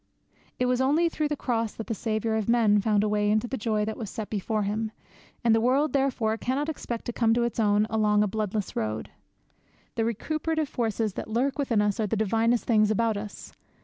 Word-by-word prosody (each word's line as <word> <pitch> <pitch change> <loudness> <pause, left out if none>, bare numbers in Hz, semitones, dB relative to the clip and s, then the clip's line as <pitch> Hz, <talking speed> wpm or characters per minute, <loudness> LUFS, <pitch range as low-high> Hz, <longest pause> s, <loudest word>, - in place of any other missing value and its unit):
It 250 - +1
was 250 0 +1
only 305 +6 +3
through 310 -2 -1
the 295 - -2
Cross 230 -5 -2
that 225 - -6
the 230 - -2
Saviour 220 0 -1
of 220 0 -1
men 220 -3 +4
found 210 -1 +2
a - - +1
way 210 0 +1
into 215 +3 +2
the 265 - -3
joy 215 -3 0
that 220 - -4
was 220 -5 -5
set 215 +1 -6
before 215 +1 -1
Him, 215 +2 -2 0.5
and 230 -2 +4
the 225 - +3
world 270 +5 +2
therefore 245 -5 +1
cannot 275 +6 -1
expect 240 -6 -5
to 240 - -3
come 225 -1 +2
to 240 - +2
its 235 0 -2
own 210 -1 +3
along 210 -1 +2
a - - +1
bloodless 210 0 -3
road. 110 0 -3 0.8
The 225 - 0
recuperative 310 +7 -1
forces 225 -3 -1
that - - -6
lurk 260 +6 0
within 230 -7 +2
us 205 0 0
are 215 - +1
the 225 - -1
divinest 225 +3 +1
things 215 -3 +3
about 225 +1 +1
us. 205 0 -7
225 Hz, 215 wpm, -27 LUFS, 210-245 Hz, 0.8 s, men